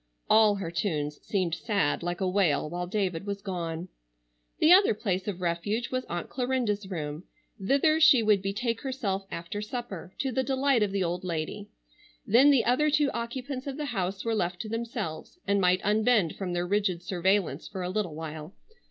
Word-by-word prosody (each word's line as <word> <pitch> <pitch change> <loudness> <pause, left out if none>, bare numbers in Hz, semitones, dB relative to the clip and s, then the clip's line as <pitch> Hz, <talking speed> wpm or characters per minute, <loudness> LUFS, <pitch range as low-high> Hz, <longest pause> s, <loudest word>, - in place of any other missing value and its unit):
All 215 -1 +5
her 185 -4 -4
tunes 150 -4 -2
seemed 185 -5 -1
sad 200 -7 0
like 175 +1 -3
a 190 - +1
wail 180 -6 +2
while 175 +3 -4
David 190 -2 -2
was 200 0 -4
gone. 170 -3 -4 0.7
The 315 - +5
other 385 - +6
place 190 -3 -2
of 185 -3 -4
refuge 195 +7 -1
was 255 -1 -2
Aunt 175 0 -4
Clarinda's 245 -6 -1
room. 155 -2 -5 0.4
Thither 280 +8 +3
she 305 -7 +7
would 210 -2 +4
betake 225 +4 -2
herself 205 -8 -3
after 170 +5 -5
supper, 210 -5 -6
to 270 - -1
the 260 - +1
delight 265 -1 +2
of 205 -2 +1
the 195 -1 0
old 175 +2 -2
lady. 180 +4 -4 0.6
Then 255 +7 +6
the 275 -5 +4
other 280 +6 +3
two 295 -1 +2
occupants 255 +3 -5
of 275 0 -4
the 300 - -3
house 195 0 -2
were 230 - +1
left 180 -4 -1
to 215 - -6
themselves 225 - -4
and 200 0 +2
might 180 0 +3
unbend 215 -4 +2
from 185 -3 -4
their 175 0 -1
rigid 190 -2 0
surveillance 180 -4 0
for 190 -3 -5
a 180 - -2
little 185 -6 -2
while. 155 +1 -7
200 Hz, 185 wpm, -28 LUFS, 175-235 Hz, 0.7 s, she